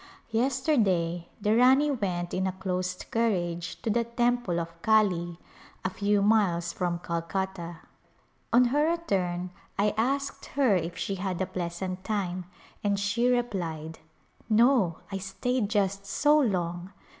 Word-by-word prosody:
Yesterday 225 Hz, -, +1 dB
the 210 Hz, +1 st, +2 dB
Rani 265 Hz, +5 st, +5 dB
went 180 Hz, -8 st, -2 dB
in 190 Hz, +1 st, 0 dB
a -, -, 0 dB
closed 185 Hz, -1 st, -3 dB
carriage 175 Hz, -7 st, -1 dB
to 225 Hz, -, +1 dB
the 235 Hz, +2 st, +2 dB
temple 240 Hz, -6 st, 0 dB
of 170 Hz, 0 st, -7 dB
Kali, 180 Hz, -6 st, +2 dB, 0.5 s
a 185 Hz, -, 0 dB
few 200 Hz, +1 st, +1 dB
miles 180 Hz, -6 st, +2 dB
from 175 Hz, -2 st, -1 dB
Calcutta. 170 Hz, 0 st, -4 dB, 0.7 s
On 245 Hz, +2 st, +6 dB
her 295 Hz, +2 st, +3 dB
return 185 Hz, -, -1 dB, 0.3 s
I 205 Hz, +1 st, +2 dB
asked 275 Hz, +4 st, -1 dB
her 260 Hz, -8 st, +4 dB
if 170 Hz, -1 st, -2 dB
she 195 Hz, -, -2 dB
had 185 Hz, -2 st, -3 dB
a 190 Hz, -, +1 dB
pleasant 185 Hz, +1 st, -4 dB
time 185 Hz, -4 st, -2 dB, 0.4 s
and 200 Hz, -1 st, +1 dB
she 220 Hz, +4 st, +1 dB
replied, 175 Hz, -10 st, -2 dB, 0.3 s
" -, -, -31 dB
No, 220 Hz, -6 st, +4 dB
I 195 Hz, -, -2 dB
stayed 205 Hz, +4 st, -1 dB
just 200 Hz, -2 st, 0 dB
so 295 Hz, +9 st, +4 dB
long 180 Hz, -, -1 dB
195 Hz, 140 wpm, -28 LUFS, 175-230 Hz, 0.7 s, On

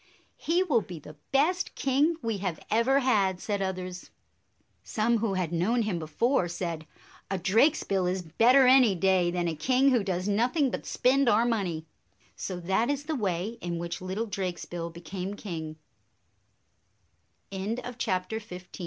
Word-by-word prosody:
" -, -, -40 dB
He 350 Hz, +3 st, +4 dB
will 280 Hz, -11 st, +2 dB
be 180 Hz, -4 st, -8 dB
the 150 Hz, 0 st, -12 dB, 0.2 s
best 330 Hz, +7 st, +1 dB
king 280 Hz, +5 st, +2 dB
we 225 Hz, -3 st, -2 dB
have 185 Hz, -4 st, -3 dB
ever 250 Hz, +5 st, +3 dB
had," 200 Hz, -8 st, +2 dB
said 205 Hz, 0 st, -2 dB
others. 185 Hz, -1 st, -4 dB, 0.7 s
Some 230 Hz, +1 st, +1 dB
who 210 Hz, -3 st, -1 dB
had 180 Hz, -3 st, -1 dB
known 220 Hz, +8 st, +1 dB
him 200 Hz, -5 st, -2 dB
before 175 Hz, -, +1 dB
said, 170 Hz, -2 st, -4 dB, 0.4 s
"A 195 Hz, -, -1 dB
Drakesbill 195 Hz, -, +2 dB
is 180 Hz, 0 st, -1 dB
better 240 Hz, -, +5 dB
any 250 Hz, -5 st, +6 dB
day 185 Hz, -1 st, +2 dB
than 175 Hz, 0 st, -1 dB
a 165 Hz, -, -1 dB
king 260 Hz, -, +3 dB
who 240 Hz, -5 st, +2 dB
does 185 Hz, -1 st, -2 dB
nothing 245 Hz, +7 st, +1 dB
but -, -, -5 dB
spend 265 Hz, 0 st, +3 dB
our 225 Hz, +2 st, +4 dB
money." 185 Hz, -9 st, -1 dB, 0.5 s
So 185 Hz, -2 st, -5 dB
that 190 Hz, +8 st, +1 dB
is 285 Hz, 0 st, -1 dB
the 315 Hz, +2 st, -3 dB
way 205 Hz, 0 st, -2 dB
in 175 Hz, -1 st, -3 dB
which 170 Hz, +1 st, -5 dB
little 190 Hz, +5 st, -3 dB
Drakesbill 175 Hz, -4 st, -4 dB
became 180 Hz, +4 st, -6 dB
king. 160 Hz, -7 st, -6 dB
195 Hz, 150 wpm, -28 LUFS, 175-245 Hz, 0.7 s, any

